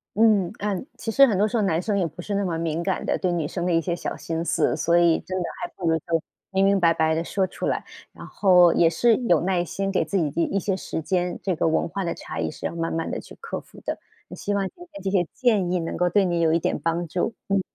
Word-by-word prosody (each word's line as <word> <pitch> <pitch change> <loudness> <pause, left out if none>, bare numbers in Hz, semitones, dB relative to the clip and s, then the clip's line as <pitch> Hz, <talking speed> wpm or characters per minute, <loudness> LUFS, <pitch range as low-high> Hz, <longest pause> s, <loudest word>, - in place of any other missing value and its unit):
嗯， 210 -4 +4
嗯， 205 +5 -2
其 225 - -4
实 275 +4 +7
很 210 -6 +1
多 210 - +3
时 215 - -4
候 225 - +2
男 165 -5 +1
生 205 +1 -1
也 185 - +1
不 160 +3 -9
是 205 - -4
那 200 0 +1
么 170 -4 -1
敏 165 0 -2
感 185 +1 -2
的， - - +1
对 185 - 0
女 165 -4 -1
生 175 +2 -3
的 180 - +1
一 165 - +4
些 170 +1 -2
小 - - -5
心 165 0 -3
思。 - - +1
所 170 +1 +2
以 170 -1 +4
真 185 0 -5
的 - - 0 0.2
还 - - -4
不 175 - -3
如 160 - +3
就 165 +1 -1 0.3
明 195 0 +3
明 200 0 +4
白 170 -2 +4
白 160 -1 +2
地 165 +1 0
说 190 +2 0
出 185 - -4
来， - - -1 0.3
然 - - -11
后 180 -4 +5
也 165 - +4
是 230 +6 +3
有 210 -10 +2
耐 180 0 +1
心， 195 +3 -3
给 190 - +2
自 200 - -2
己 155 -5 0
一 170 - +2
一 - - +3
些 195 0 -1
时 180 - -4
间， 180 +2 -1
这 190 -3 0
个 165 - +1
文 160 - +1
化 195 +3 -4
的 170 - -2
差 - - -7
异 80 -1 -1
是 - - -8
要 - - -2
慢 165 0 -2
慢 165 0 -2
地 - - -3
去 - - -13
克 460 - -5
服 - - -16
的， - - -3 0.3
也 - - -8
希 205 - -3
望 200 -1 0
今 - - -35 0.2
天 200 - -9
这 195 - -1
些 180 -4 +2
建 215 -8 +2
议 180 - +1
能 165 - -4
够 180 0 +2
对 200 +1 +3
你 175 -2 0
有 160 -1 +3
一 165 - +3
点 - - -1
帮 170 +1 -1
助， 180 +8 -2
嗯。 195 -1 +2
180 Hz, 315 characters per minute, -24 LUFS, 165-195 Hz, 0.3 s, 实